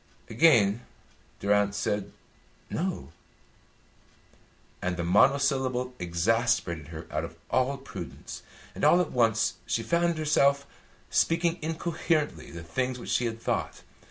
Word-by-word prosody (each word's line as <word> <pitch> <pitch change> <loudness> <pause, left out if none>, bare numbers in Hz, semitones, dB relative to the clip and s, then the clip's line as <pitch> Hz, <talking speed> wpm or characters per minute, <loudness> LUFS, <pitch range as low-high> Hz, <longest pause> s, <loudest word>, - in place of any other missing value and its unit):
Again 115 -5 +4 0.6
Durrance 100 0 +2
said 105 -1 -2 0.6
"No," 185 +2 -3 1.7
and 90 -1 -2
the 85 - -2
monosyllable 130 - +2
exasperated 90 - 0
her 80 0 -8
out 75 +1 -1
of 85 0 -7 0.2
all 130 +2 +1
prudence, 135 - -8 0.3
and - - -8
all 175 - +6
at 180 - 0
once 115 -2 +2
she 115 - 0
found 170 +5 +1
herself 140 -2 +3 0.5
speaking 170 +1 +2
incoherently 160 -1 -1
the 85 -1 -8
things 125 +10 -2
which 120 - -6
she 125 - +2
had 115 0 -5
thought. - - -3
125 Hz, 120 wpm, -28 LUFS, 100-150 Hz, 1.7 s, all